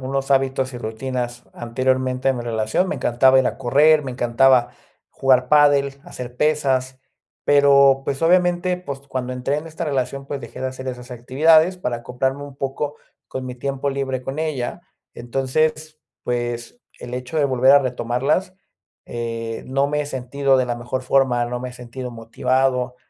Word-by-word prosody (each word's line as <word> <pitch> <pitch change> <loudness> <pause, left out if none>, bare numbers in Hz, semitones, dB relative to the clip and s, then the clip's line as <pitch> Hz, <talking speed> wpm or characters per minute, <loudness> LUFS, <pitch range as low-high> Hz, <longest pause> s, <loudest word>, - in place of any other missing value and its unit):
unos 135 +1 -3
hábitos 135 -1 +1
y 120 - -6
rutinas 120 +1 -4
anteriormente 130 +2 -1
en 130 - +1
mi 120 - -4
relación. 110 - 0
Me - - -2
encantaba 130 +2 +4
ir 130 - +3
a - - -3
correr, 150 +4 +4
me 135 - -5
encantaba 125 0 +3 0.4
jugar 130 -2 +2
pádel, 140 -2 +4
hacer 125 0 -9
pesas, 135 -4 0 0.5
pero 140 -1 +5
pues, 135 +2 -3
obviamente, 180 +1 +3
pues, 140 -6 -7
cuando 130 -2 -5
entré 125 +3 -2
en 150 - -5
esta 165 +1 -5
relación, 135 -1 -2
pues 140 -1 -5
dejé 115 - -10
de 130 - -1
hacer 130 0 -7
esas 125 0 -7
actividades 155 +8 +3
para 125 -9 -3
acoplarme 130 +4 -2
un 140 -1 -10
poco 140 +2 -3 0.3
con 130 - -5
mi 125 - -6
tiempo 140 +2 -3
libre 135 -2 -3
con 135 +3 -5
ella. 150 -6 -3 0.3
Entonces 155 +5 -1 0.2
pues, 120 - -3 0.2
el 120 - -9
hecho 125 +5 -5
de 150 - +3
volver 130 0 +4
a 140 - +8
retomarlas, 130 +7 -1 0.5
eh, 115 -1 -5
no 135 +2 +1
me 150 0 0
he 145 - -3
sentido 135 +1 0
de 130 - +2
la 120 -1 -2
mejor 120 +2 -4
forma. 130 -2 +2
No 120 +1 -4
me 125 - -5
he - - -10
sentido 125 +1 -7
motivado. 125 +2 -1
130 Hz, 170 wpm, -21 LUFS, 125-140 Hz, 0.5 s, a